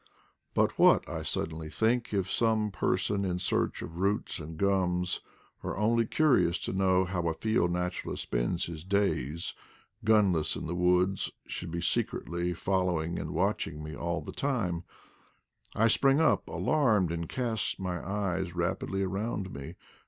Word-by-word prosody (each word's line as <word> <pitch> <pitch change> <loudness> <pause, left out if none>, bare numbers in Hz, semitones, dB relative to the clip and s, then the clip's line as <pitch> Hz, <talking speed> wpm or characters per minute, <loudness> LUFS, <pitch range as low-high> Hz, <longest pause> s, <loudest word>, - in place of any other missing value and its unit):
But - - +2
what, - - +6
I - - -4
suddenly 80 -1 -2
think, 115 +6 +1
if 95 -3 0
some 110 0 +1
person 100 +1 0
in 90 -2 -1
search 90 - 0
of 85 +2 -8
roots 100 0 0
and 80 0 -8
gums, 90 -2 +1 0.4
or - - -4
only 115 +2 +2
curious 100 - +3
to - - -3
know 95 -1 +3
how 90 -2 -2
a 80 - 0
field 110 -3 +1
naturalist 90 +1 -2
spends - - -1
his 80 -2 -7
days, 90 -5 0 0.5
gunless 100 -7 +3
in - - -5
the 80 - -3
woods, 90 +2 +2 0.2
should 90 - -5
be 85 +1 -3
secretly 85 0 -1
following 90 -2 0
and - - -4
watching 75 +1 -1
me 75 0 -6
all 85 +1 -2
the - - -7
timet 110 -12 -1 0.9
I 115 - +4
spring 135 +5 +4
up 160 - +2
alarmed, 110 - +2
and 85 -1 -3
cast 115 -5 -1
my 90 -2 -3
eyes 95 -3 -2
rapidly 90 +2 -1
around 95 0 -2
me. 70 0 -7
90 Hz, 150 wpm, -30 LUFS, 85-105 Hz, 0.9 s, what